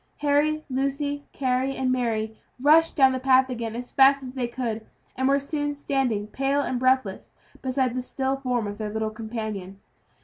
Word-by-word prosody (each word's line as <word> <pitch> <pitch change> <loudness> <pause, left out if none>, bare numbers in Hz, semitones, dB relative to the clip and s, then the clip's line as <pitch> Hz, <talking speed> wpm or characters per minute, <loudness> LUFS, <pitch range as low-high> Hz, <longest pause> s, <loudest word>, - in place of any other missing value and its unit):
Harry, 300 +1 +2
Lucy, 280 +2 -2
Carry, 260 0 0
and 260 -1 0
Mary, 220 -3 -1 0.2
rushed 315 +4 +5
down 265 -2 +6
the 260 - -2
path 260 0 +4
again 230 -2 -4
as 245 +1 -6
fast 275 0 +5
as 255 - -6
they 255 -2 -2
could, 235 -3 -3 0.3
and 260 +1 0
were 275 +1 +4
soon 290 +1 -3
standing 265 -7 -1
pale 275 +5 0
and 255 -3 -2
breathless 255 -6 +1 0.3
beside 260 -1 0
the 255 - -2
still 265 +1 -2
form 250 -4 -1
of 205 +1 -6
their 215 -1 -3
little 220 0 -2
companion. 215 -4 -6
260 Hz, 175 wpm, -25 LUFS, 230-275 Hz, 0.3 s, down